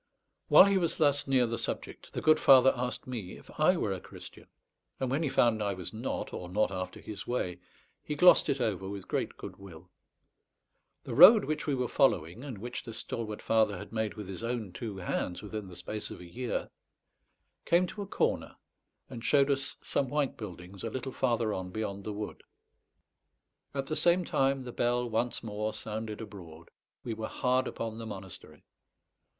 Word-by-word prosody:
While -, -, +9 dB
he 200 Hz, -1 st, +3 dB
was 170 Hz, -2 st, -1 dB
thus 145 Hz, -2 st, +2 dB
near 130 Hz, -2 st, +4 dB
the 115 Hz, 0 st, -3 dB
subject, -, -, -5 dB
the -, -, -4 dB
good 155 Hz, 0 st, +5 dB
father 135 Hz, -1 st, +7 dB
asked 125 Hz, 0 st, -3 dB
me 115 Hz, -8 st, -6 dB
if -, -, -15 dB
I -, -, +5 dB
were -, -, 0 dB
a -, -, -5 dB
Christian; -, -, -12 dB, 0.5 s
and 130 Hz, -1 st, -1 dB
when 140 Hz, +4 st, +1 dB
he 155 Hz, -, 0 dB
found 115 Hz, -4 st, +3 dB
I 100 Hz, -1 st, 0 dB
was 90 Hz, +1 st, -7 dB
not, 115 Hz, +4 st, -4 dB
or 90 Hz, -, -6 dB
not 105 Hz, +2 st, +1 dB
after 95 Hz, -1 st, -5 dB
his 105 Hz, -2 st, -8 dB
way, 90 Hz, -8 st, -2 dB, 0.4 s
he 150 Hz, -, -3 dB
glossed 180 Hz, +5 st, +6 dB
it 135 Hz, -, +1 dB
over 95 Hz, -5 st, -1 dB
with 100 Hz, -1 st, -7 dB
great -, -, -2 dB
good -, -, -8 dB
will. 90 Hz, -2 st, -13 dB, 1.1 s
The -, -, -6 dB
road 190 Hz, -, +9 dB
which 155 Hz, 0 st, -3 dB
we 145 Hz, -, +2 dB
were 125 Hz, -1 st, -1 dB
following, 110 Hz, -, +1 dB
and 135 Hz, -7 st, -6 dB
which 120 Hz, +5 st, -5 dB
this 115 Hz, -2 st, -7 dB
stalwart 110 Hz, -3 st, -4 dB
father 110 Hz, -3 st, +2 dB
had 90 Hz, -, -9 dB
made 110 Hz, -2 st, -1 dB
with 105 Hz, -3 st, -7 dB
his 95 Hz, +3 st, -7 dB
own 115 Hz, -5 st, -3 dB
two 105 Hz, 0 st, -5 dB
hands 90 Hz, 0 st, -3 dB
within 105 Hz, -1 st, -5 dB
the 90 Hz, -, -11 dB
space 100 Hz, +5 st, -4 dB
of -, -, -8 dB
a 90 Hz, -, -10 dB
year, 120 Hz, +8 st, -4 dB, 0.9 s
came 175 Hz, +2 st, +3 dB
to 205 Hz, +3 st, -7 dB
a 200 Hz, -, -5 dB
corner, -, -, -1 dB, 0.5 s
and 115 Hz, -, -8 dB
showed 140 Hz, 0 st, +4 dB
us 135 Hz, 0 st, -1 dB
some 135 Hz, -, 0 dB
white 145 Hz, -1 st, 0 dB
buildings 95 Hz, -2 st, -9 dB
a 115 Hz, -, -2 dB
little 130 Hz, +3 st, -4 dB
farther 120 Hz, -4 st, 0 dB
on 95 Hz, -1 st, -4 dB
beyond 100 Hz, 0 st, -4 dB
the 110 Hz, -, -3 dB
wood. 105 Hz, +1 st, -6 dB, 1.3 s
At 135 Hz, -1 st, -1 dB
the 155 Hz, -, -3 dB
same 175 Hz, +2 st, +3 dB
time, 135 Hz, -2 st, +1 dB
the 125 Hz, -, -6 dB
bell 120 Hz, +1 st, +1 dB
once 120 Hz, +2 st, -1 dB
more 110 Hz, 0 st, -3 dB
sounded 110 Hz, 0 st, -5 dB
abroad. 85 Hz, -6 st, -11 dB, 0.3 s
We 115 Hz, -, -3 dB
were 110 Hz, 0 st, -4 dB
hard 130 Hz, +1 st, +1 dB
upon 115 Hz, -1 st, -5 dB
the 115 Hz, -, -6 dB
monastery. 95 Hz, -4 st, -9 dB
115 Hz, 190 wpm, -30 LUFS, 100-130 Hz, 1.3 s, While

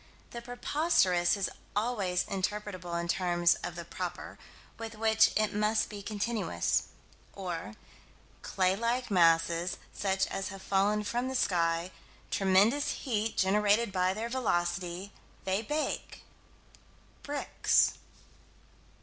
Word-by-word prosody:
The 235 Hz, -, -6 dB
preposterous 240 Hz, -, +2 dB
is 195 Hz, -, 0 dB, 0.3 s
always 205 Hz, -5 st, 0 dB
interpretable 190 Hz, -3 st, -3 dB
in 170 Hz, -, -3 dB
terms 175 Hz, -1 st, +3 dB
of -, -, -4 dB
the -, -, -6 dB
"proper," -, -, -6 dB, 0.4 s
with 225 Hz, 0 st, -6 dB
which 220 Hz, +1 st, +4 dB
it 215 Hz, -1 st, +1 dB
must 210 Hz, +1 st, +1 dB
be 205 Hz, -1 st, -7 dB
continuous 215 Hz, +2 st, -1 dB, 0.5 s
or 170 Hz, -, -5 dB, 0.7 s
clay 185 Hz, 0 st, +1 dB
like 235 Hz, +2 st, -1 dB
masses 170 Hz, -1 st, +3 dB, 0.2 s
such 190 Hz, -1 st, 0 dB
as 195 Hz, 0 st, -4 dB
have 195 Hz, -1 st, -8 dB
fallen 200 Hz, +2 st, +2 dB
from 240 Hz, +4 st, -1 dB
the 265 Hz, -, -3 dB
sky 170 Hz, -4 st, +1 dB, 0.4 s
tremendous 200 Hz, +9 st, +2 dB
heat 225 Hz, -3 st, -1 dB
generated 210 Hz, +3 st, +3 dB
by 185 Hz, 0 st, +1 dB
their 225 Hz, +2 st, -3 dB
velocity 180 Hz, -5 st, -1 dB, 0.3 s
they 190 Hz, +2 st, 0 dB
bake 295 Hz, +7 st, -3 dB, 1.0 s
bricks. 290 Hz, 0 st, +2 dB
200 Hz, 115 wpm, -30 LUFS, 180-225 Hz, 1.0 s, which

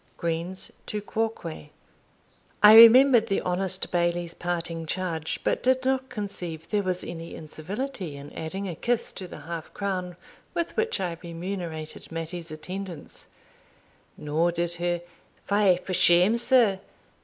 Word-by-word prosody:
Greene's 170 Hz, +3 st, -3 dB, 0.2 s
Tu 210 Hz, -, -3 dB
Quoque. 210 Hz, -8 st, -4 dB, 0.9 s
I 210 Hz, +1 st, +10 dB
remembered 230 Hz, +1 st, +9 dB
the 195 Hz, -, +1 dB
honest 185 Hz, +1 st, -1 dB
Bailie's 175 Hz, -1 st, 0 dB
parting 170 Hz, -2 st, -3 dB
charge, 165 Hz, -3 st, -3 dB
but -, -, 0 dB
did 260 Hz, +1 st, +2 dB
not 265 Hz, 0 st, 0 dB
conceive 180 Hz, -8 st, -5 dB
there 210 Hz, -1 st, +1 dB
was 185 Hz, -2 st, -1 dB
any 165 Hz, 0 st, -7 dB
incivility 175 Hz, -, -5 dB
in 140 Hz, +1 st, -11 dB
adding 190 Hz, +5 st, -5 dB
a 180 Hz, -, -4 dB
kiss 235 Hz, +7 st, -1 dB
to 185 Hz, -, -7 dB
the -, -, -10 dB
half 165 Hz, -1 st, -7 dB
crown 185 Hz, -3 st, -3 dB, 0.4 s
with 340 Hz, -1 st, -2 dB
which 450 Hz, -, 0 dB
I 175 Hz, -3 st, -3 dB
remunerated 170 Hz, -3 st, -6 dB
Mattie's 165 Hz, +1 st, -5 dB
attendance; 180 Hz, +1 st, -7 dB, 0.9 s
nor 155 Hz, +4 st, 0 dB
did 170 Hz, 0 st, -2 dB
her 175 Hz, 0 st, -1 dB, 0.4 s
"Fie 200 Hz, -3 st, +3 dB
for 185 Hz, +1 st, -6 dB
shame, 180 Hz, +4 st, +5 dB
sir!" 235 Hz, -5 st, +4 dB
180 Hz, 135 wpm, -26 LUFS, 165-210 Hz, 0.9 s, I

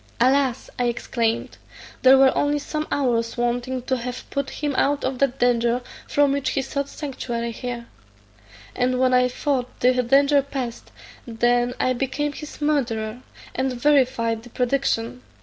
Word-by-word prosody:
"Alas!" 260 Hz, 0 st, +2 dB
I 245 Hz, -, +2 dB
exclaimed, 235 Hz, -1 st, -1 dB, 0.4 s
"there 265 Hz, +1 st, +7 dB
were 265 Hz, 0 st, +5 dB
only 290 Hz, 0 st, +1 dB
some 305 Hz, +1 st, -4 dB
hours 235 Hz, -5 st, 0 dB
wanting 245 Hz, +1 st, -1 dB
to 260 Hz, +1 st, 0 dB
have 250 Hz, +1 st, -6 dB
put 280 Hz, -1 st, -2 dB
him 295 Hz, -2 st, -3 dB
out 285 Hz, +2 st, +1 dB
of 260 Hz, -1 st, -2 dB
that 275 Hz, -1 st, +1 dB
danger 240 Hz, -1 st, +2 dB, 0.3 s
from 285 Hz, -1 st, +3 dB
which 275 Hz, -1 st, 0 dB
he 270 Hz, -, -1 dB
sought 280 Hz, +1 st, -3 dB
sanctuary 240 Hz, -5 st, -4 dB
here; 240 Hz, 0 st, -5 dB, 0.9 s
and 250 Hz, 0 st, +1 dB
when 255 Hz, 0 st, +3 dB
I 250 Hz, 0 st, +5 dB
thought 255 Hz, 0 st, -2 dB
the 250 Hz, +1 st, +4 dB
danger 280 Hz, +3 st, +4 dB
past, 265 Hz, -4 st, -5 dB, 0.4 s
then 240 Hz, +1 st, +1 dB
I 255 Hz, -, +2 dB
became 275 Hz, +3 st, -2 dB
his 300 Hz, 0 st, -9 dB
murderer, 245 Hz, -6 st, -1 dB, 0.3 s
and 260 Hz, 0 st, -1 dB
verified 245 Hz, -4 st, +2 dB
the 245 Hz, -, -13 dB
prediction. 250 Hz, -1 st, -1 dB
255 Hz, 150 wpm, -23 LUFS, 240-275 Hz, 0.9 s, there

